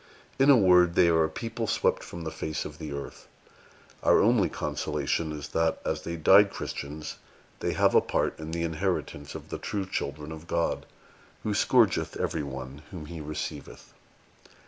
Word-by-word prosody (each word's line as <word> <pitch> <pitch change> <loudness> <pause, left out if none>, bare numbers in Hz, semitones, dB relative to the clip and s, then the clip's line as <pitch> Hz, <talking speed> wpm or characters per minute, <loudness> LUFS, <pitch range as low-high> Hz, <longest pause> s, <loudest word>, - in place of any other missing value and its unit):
In 135 +2 +5
a 140 - +9
word, 90 -4 +5
they 85 - +5
are 80 -1 +4
a - - -3
people 115 +6 -4
swept - - +1
from 85 - -8
the 80 - -4
face 80 -1 -4
of - - -8
the 75 - -6
earth. 70 0 -7 0.7
Our - - +5
only 110 -4 +4
consolation 80 -2 -2
is, 75 -1 -6
that, 80 0 +1
as 80 0 -1
they 85 - -4
died 95 +5 +6
Christians, 75 -3 -6 0.4
they - - -1
have - - +3
a - - +6
part - - -1
in 80 0 -6
the 85 +1 -2
inheritance 80 -3 -2
of - - -9
the - - -5
true 100 -2 -3
children 75 -4 -4
of 80 +1 -9
God, 85 -1 -1 0.6
who 105 - -1
scourgeth 110 -1 +3
every 80 - -1
one 65 0 -7
whom 85 -5 -8
He 80 +1 -7
receiveth." 75 -1 -6
80 Hz, 175 wpm, -28 LUFS, 75-95 Hz, 0.7 s, a